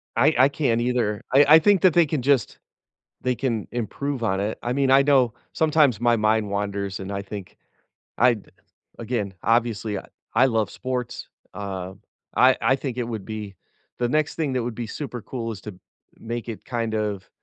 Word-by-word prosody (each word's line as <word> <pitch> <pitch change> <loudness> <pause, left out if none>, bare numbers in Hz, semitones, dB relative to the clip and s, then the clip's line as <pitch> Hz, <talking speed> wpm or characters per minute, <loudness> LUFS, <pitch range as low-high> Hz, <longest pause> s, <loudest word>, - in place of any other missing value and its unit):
I 145 +7 +4
I 130 +2 +6
can't 125 -6 0
either, 120 -4 0
I 140 +2 +7
I 155 +2 +9
think 195 +2 +4
that 185 -3 +5
they 170 -2 +5
can 145 -3 -2
just 135 -4 +1 0.6
they 125 0 0
can 115 -4 -2
improve 125 +3 -3
on 95 -2 0
it. 105 +2 -2
I 120 - -1
mean, 135 0 +1
I 135 +1 +7
know 135 -5 +3 0.2
sometimes 150 -8 +3
my 120 0 +3
mind 110 -1 +1
wanders, 100 -1 -3
and 95 +1 -6
I 100 0 -3
think 100 -1 -8 0.6
I'd 115 -5 +2 0.5
again, 110 -4 -3
obviously, 115 -2 +1 0.4
I 125 +4 +5
love 115 -4 0
sports, 125 -1 -4 0.3
uh, 95 -2 -5 0.4
I 130 0 +6
I 120 +5 +3
think 130 -2 -5
it 120 - 0
would 110 -4 -5
be 105 -3 -6 0.4
the 120 -1 0
next 155 +2 +1
thing 155 -4 -1
that 130 -1 0
would 120 -1 -4
be 120 0 -4
super 120 -1 -6
cool 115 -2 -4
is 105 - -9
to 105 -3 -8 0.4
make 120 0 -5
it 115 - -7
kind 115 -3 -2
of 105 -3 -2
120 Hz, 185 wpm, -24 LUFS, 105-130 Hz, 0.6 s, I